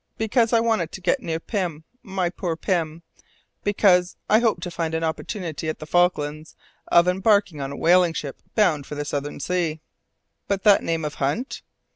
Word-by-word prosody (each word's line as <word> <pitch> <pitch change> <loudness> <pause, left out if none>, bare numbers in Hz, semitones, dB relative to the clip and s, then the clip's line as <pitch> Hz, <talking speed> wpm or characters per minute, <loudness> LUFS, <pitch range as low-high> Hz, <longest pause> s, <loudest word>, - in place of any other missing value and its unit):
Because 225 +1 +2
I 230 - +5
wanted 225 -8 0
to - - -6
get 175 - +1
near 165 -1 -3
Pym, 175 -5 -3 0.2
my 190 -3 -2
poor 175 -2 -3
Pym 165 -2 -2 0.6
because 185 -3 +3
I 215 - +5
hoped 220 -7 +1
to 180 - -4
find 165 -1 -2
an 160 - -1
opportunity 165 -1 -3
at 155 - -3
the 155 - -8
Falklands 155 -3 0 0.3
of 170 +1 +5
embarking 190 -3 +2
on 135 0 -4
a 140 - -6
whaling 175 0 +4
ship 140 -3 -6
bound 165 -10 +2
for 150 - -6
the 145 0 -3
southern 145 0 -4
sea." 165 0 -1 0.7
"But 195 -1 -1
that 205 -2 +6
name 165 -1 -2
of 150 - -3
Hunt?" 210 - -1
175 Hz, 180 wpm, -23 LUFS, 155-195 Hz, 0.7 s, that